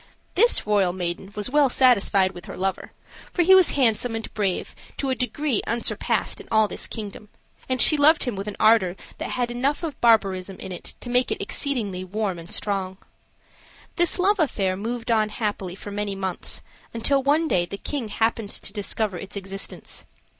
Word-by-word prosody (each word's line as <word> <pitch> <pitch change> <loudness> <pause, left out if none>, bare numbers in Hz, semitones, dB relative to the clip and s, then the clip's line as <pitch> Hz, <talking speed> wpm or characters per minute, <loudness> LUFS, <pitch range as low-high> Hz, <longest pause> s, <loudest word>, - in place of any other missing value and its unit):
This 470 +6 +3
royal 200 -4 +2
maiden 180 +2 -4
was 210 +4 -2
well 290 -2 +4
satisfied 205 -7 +4
with 175 -2 -11
her - - -8
lover, 190 +1 -2 0.4
for 355 - +2
he 380 +3 +6
was 375 -2 +7
handsome 235 -2 +2
and 225 - -6
brave 200 -4 -2 0.2
to 270 -2 -1
a - - +3
degree 250 0 -1
unsurpassed 235 0 -1
in - - -15
all 220 -1 +4
this - - -5
kingdom, 210 -1 -7 0.4
and 255 0 0
she 305 - +8
loved 300 +2 +5
him 245 -5 -3
with 195 +2 -5
an 210 - -5
ardor 215 -5 +4 0.2
that - - -4
had 245 -1 -1
enough 270 +7 -1
of 310 -5 -5
barbarism 195 -5 +2
in 190 - -8
it 180 - -8
to 245 - -6
make 250 +1 +2
it - - -2
exceedingly 215 -10 -1
warm 195 -1 -3
and 165 +1 -10
strong. 190 -2 -1 1.0
This 345 -1 +3
love 390 +2 +2
affair 195 - +1
moved 230 +4 -4
on 215 -2 +2
happily 205 -4 -3
for 205 - -9
many 205 -1 -3
months, 190 -2 -4 0.3
until 275 +4 +2
one 295 +4 +2
day 175 - +1
the 200 - -6
king 270 +1 -4
happened 225 0 -1
to - - -2
discover 205 -2 -1
its 200 +1 -9
existence. 195 0 -6
215 Hz, 185 wpm, -24 LUFS, 195-255 Hz, 1.0 s, she